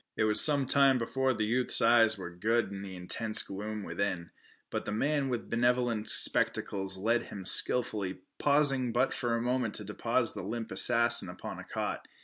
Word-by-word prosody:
It - - 0
was 105 -1 +5
some 145 -3 +6
time 135 0 +3
before 130 +3 -2
the 110 -4 -3
youth's 125 +3 +3
eyes 115 -1 +3
were 90 -2 -9
good 110 +4 -2
in 100 -1 -8
the 95 -1 -9
intense 110 +5 +1
gloom 105 +2 -7
within, 90 -5 -5 0.4
but - - -5
the - - -5
man 140 +5 -2
with 120 -2 -5
benevolent 120 -2 -1
spectacles 95 -1 0
led 115 +4 -1
him 95 -2 -10
skilfully, 100 -5 +2 0.2
pausing 140 -4 0
but 125 +3 -1
a 115 -1 -1
moment 125 -2 -3
to - - -5
deposit - - -2
the - - -7
limp 115 +1 -6
assassin 120 -1 +4
upon - - -9
a - - -10
cot. - - -6
115 Hz, 175 wpm, -28 LUFS, 105-125 Hz, 0.4 s, some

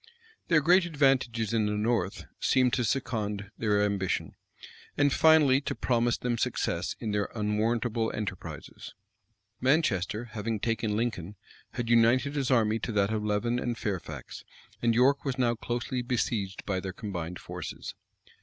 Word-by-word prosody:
Their 165 -3 +4
great 175 +4 +5
advantages 135 - +1
in 110 -2 +2
the 105 - -1
north 105 -2 -1
seemed 130 -2 +3
to 125 - +1
second 105 -4 -2
their 105 -2 +2
ambition, 100 -3 -1 0.6
and 145 -1 +3
finally 150 -4 +5
to - - -3
promise 120 -1 +1
them 120 -2 -2
success - - -1
in 110 - -3
their 105 -1 0
unwarrantable 110 +2 0
enterprises. 105 -3 -7 0.6
Manchester, 120 - +1
having 110 0 -3
taken 115 -1 -1
Lincoln, 105 -5 -2 0.4
had 120 - -3
united 120 +4 +4
his 140 -3 -1
army 115 -3 +3
to 115 - -3
that 100 +1 +2
of 105 -1 -1
Leven 105 +3 0
and 120 -1 -2
Fairfax; 100 -5 -5 0.4
and 115 -1 +2
York 135 +4 +4
was 135 -2 -2
now 120 -2 +2
closely 120 +2 -3
besieged 115 -5 -2
by 95 -2 -1
their 95 0 -5
combined 90 -4 -5
forces. - - -7
115 Hz, 145 wpm, -28 LUFS, 105-125 Hz, 0.6 s, great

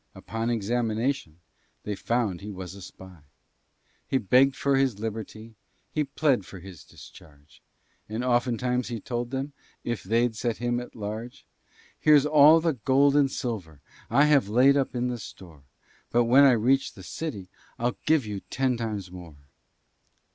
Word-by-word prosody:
Upon 115 +1 -4
examination 115 - -1 0.4
They 105 - -3
found 105 -3 -1
he 105 - -7
was 95 -2 -7
a 100 - -11
spy. 95 -1 -13 0.9
He 135 - +1
beggèd 130 +5 +4
for 140 -1 +1
his 135 -6 +1
liberty, 110 +1 -6 0.4
He 155 - 0
plead 140 -5 +1
for 95 - -11
his 90 -3 -12
discharge, 75 -1 -17 0.5
And 110 +3 -3
oftentimes 125 0 0
he 120 -2 -4
told 120 +1 -4
them, 135 +2 -4 0.3
If 120 -6 -3
they'd 115 +4 0
set 115 +1 -2
him 120 0 -1
at 125 - -10
large, 110 +2 -7 0.5
"Here's 150 -2 +5
all 150 +2 +7
the 165 -1 0
gold 135 +3 +2
and 145 -2 +4
silver 100 - -5 0.3
I 140 +6 +4
have 140 -8 +3
laid 130 +5 +5
up 135 -2 -1
in 125 0 -1
store, 80 -10 -12 0.4
But 120 0 +3
when 130 +4 +6
I 135 - +6
reach 135 +4 +1
the 95 - -12
city, 100 - -6 0.3
I'll 120 +1 -2
give 155 -6 +3
you 105 -2 -5
ten 130 -2 0
times 105 -6 -4
more." 85 -5 -11
120 Hz, 155 wpm, -26 LUFS, 105-135 Hz, 0.9 s, all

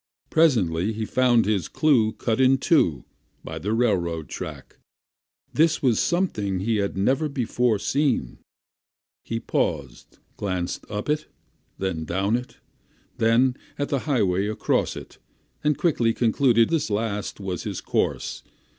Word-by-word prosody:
Presently 110 - +2
he 110 +1 -3
found 120 -2 +3
his 100 -6 0
clue 120 -8 +2
cut 115 +1 -1
in 130 +1 +5
two 130 - +2 0.4
by 80 0 -6
the 100 +7 -3
railroad 90 - 0
track; - - -8 0.8
this 160 0 +2
was 120 -5 +3
something 110 - 0
he 110 +2 0
had 100 -1 -2
never 135 +10 +1
before 125 -3 0
seen; 130 - 0 0.8
he 115 - -3
paused, 70 - -3 0.2
glanced 90 -3 -3
up 105 0 -4
it, 150 +1 -1 0.5
then 95 -4 -2
down 95 +7 0
it, 125 +1 -5 0.6
then 120 +3 +3 0.2
at 145 - -2
the 140 - 0
highway 100 -7 +2
across 110 - 0
it, - - -10 0.4
and 150 -2 +2
quickly 120 -9 +1
concluded 115 0 +3
this 165 -7 0
last 105 -1 -2
was 95 -3 -4
his - - -4
course. - - -2
110 Hz, 135 wpm, -24 LUFS, 95-130 Hz, 0.8 s, in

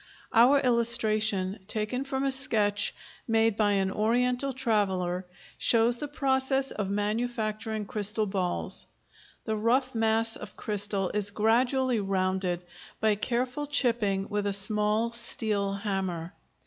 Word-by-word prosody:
Our 250 +5 +6
illustration, 215 -5 +1
taken 220 +5 -2
from 270 -1 -3
a 275 - +1
sketch 215 -6 +1 0.3
made 225 -1 +2
by 205 -1 +2
an 190 -1 0
Oriental 245 +5 0
traveller, 190 -8 -1 0.3
shows 235 +1 +4
the 295 - -4
process 270 -1 0
of 205 -2 -4
manufacturing 215 0 -2
crystal 210 +2 +2
balls. 190 -3 -1 0.6
The 220 - -1
rough 230 +5 +1
mass 225 0 +2
of - - -10
crystal 205 -3 -2
is 210 -1 +1
gradually 245 +4 +1
rounded 185 -2 -1 0.4
by 220 -1 +2
careful 250 +6 -2
chipping 230 -8 +1
with 205 -1 -2
a 200 - 0
small 210 +3 +2
steel 215 -4 -1
hammer. 190 -4 -4
215 Hz, 120 wpm, -27 LUFS, 200-240 Hz, 0.6 s, Our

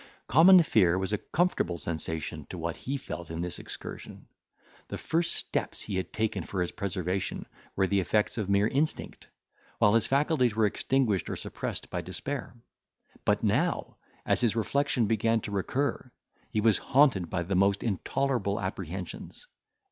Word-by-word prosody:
Common 170 +6 +7
fear 95 - +3
was 95 +2 -2
a 105 - +1
comfortable 160 - 0
sensation 80 0 -4
to - - -6
what 85 0 -3
he 140 +2 -4
felt 85 -10 -7
in 80 +1 -4
this 90 0 -3
excursion. - - -8 0.6
The - - -5
first 170 +1 0
steps - - -2
he 100 -3 -3
had 95 - -3
taken 110 -1 -1
for 95 - -4
his 85 - -4
preservation 95 -2 -2 0.3
were 95 - +3
the 100 +1 +2
effects 105 +5 +1
of 100 -3 -2
mere 100 +1 +4
instinct, 145 +6 -2 0.5
while 105 - +4
his 115 -1 +3
faculties 135 -4 +2
were 110 -1 +3
extinguished 110 -1 +1
or - - -2
suppressed - - -5
by - - -2
despair; 140 -3 -5 0.7
but 105 +1 +2
now, 130 - 0 0.3
as - - +3
his 115 -3 +2
reflection 130 +1 +1
began 115 +1 +2
to 105 - -6
recur, 130 +6 -1 0.4
he 110 - 0
was 110 -1 +4
haunted 125 - +3
by 85 -2 -1
the 95 +4 -3
most 100 +2 +3
intolerable 115 0 0
apprehensions. 95 -3 -6
105 Hz, 160 wpm, -29 LUFS, 95-130 Hz, 0.7 s, Common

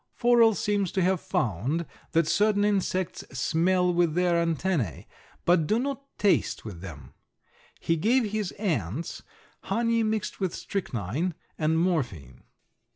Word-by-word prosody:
Forel 235 -2 +5
seems 205 -3 0
to 190 - +1
have 185 -1 +2
found 125 - -1 0.3
that 165 0 +4
certain 205 +2 +3
insects 190 -3 0 0.2
smell 180 +5 +2
with 170 -2 +2
their 175 -1 +2
antennæ, 165 - -1 0.4
but 170 -3 +3
do 215 - +2
not 275 +2 -4
taste 205 - +1
with 95 -6 -8
them. 75 -9 -10 0.7
He 165 - 0
gave 225 +5 +2
his 210 -3 -2
ants 155 - -3 0.4
honey 230 0 +1
mixed 215 -1 -2
with 190 -4 -1
strychnine 155 - -3 0.2
and 160 0 +2
morphine. 125 - -1
180 Hz, 130 wpm, -27 LUFS, 155-205 Hz, 0.7 s, Forel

